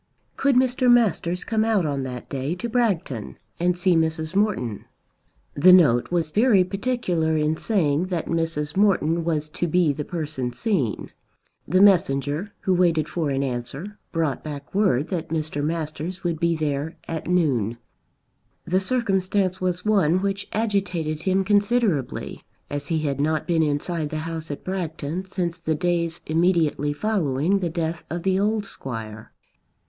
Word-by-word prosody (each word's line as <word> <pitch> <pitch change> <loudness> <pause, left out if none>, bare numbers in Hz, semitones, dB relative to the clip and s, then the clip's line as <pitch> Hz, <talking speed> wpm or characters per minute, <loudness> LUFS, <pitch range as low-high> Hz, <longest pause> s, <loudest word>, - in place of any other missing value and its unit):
Could 275 -1 +2
Mr. 255 0 +3
Masters 185 -6 +2
come 220 -1 0
out 220 -6 +2
on 140 -2 -1
that 125 -2 -6
day 140 +4 -3
to 210 +6 -4
Bragton 190 - -1 0.2
and 180 +1 +1
see 180 0 +3
Mrs. 160 +1 0
Morton. 190 - 0 0.7
The 185 +6 +6
note 145 -10 +5
was 170 -3 0
very 210 -1 +4
particular 185 -6 -1
in 155 +1 +1
saying 165 -4 +1
that 175 -3 -2
Mrs. 165 -3 -2
Morton 175 -5 +2
was 155 -2 -1
to 175 +2 -2
be 170 -2 +2
the 150 - -4
person 150 -7 -4
seen. 140 - -1 0.6
The 185 +4 +3
messenger 165 -2 +3
who 190 - +1
waited 170 -4 +2
for 165 -4 -2
an 135 0 0
answer, 135 +10 -5
brought 160 -5 -1
back 145 -2 -7
word 185 -8 +2
that 175 -4 -3
Mr. 155 -2 -2
Masters 160 +3 -3
would 170 -3 -1
be 170 0 +2
there 150 0 -2
at 160 -2 -4
noon. 130 - +1 0.9
The 185 +2 +2
circumstance 195 -4 0
was 180 0 -1
one 185 -5 +3
which 200 0 -2
agitated 185 -8 -1
him 190 +1 +1
considerably, 205 - 0 0.3
as 145 0 -4
he 160 -2 0
had 140 -2 -1
not 155 +1 0
been 170 -2 +2
inside 155 +1 -1
the 155 - -4
house 160 -1 -5
at 145 - -6
Bragton 175 -2 -3
since 180 -2 -3
the 160 -1 -1
days 170 0 -1
immediately 160 -3 +2
following 170 -1 0
the 175 -3 -1
death 165 0 -3
of 170 +1 -4
the 190 0 +2
old 210 +1 +1
Squire. 110 - -7
170 Hz, 155 wpm, -24 LUFS, 150-190 Hz, 0.9 s, The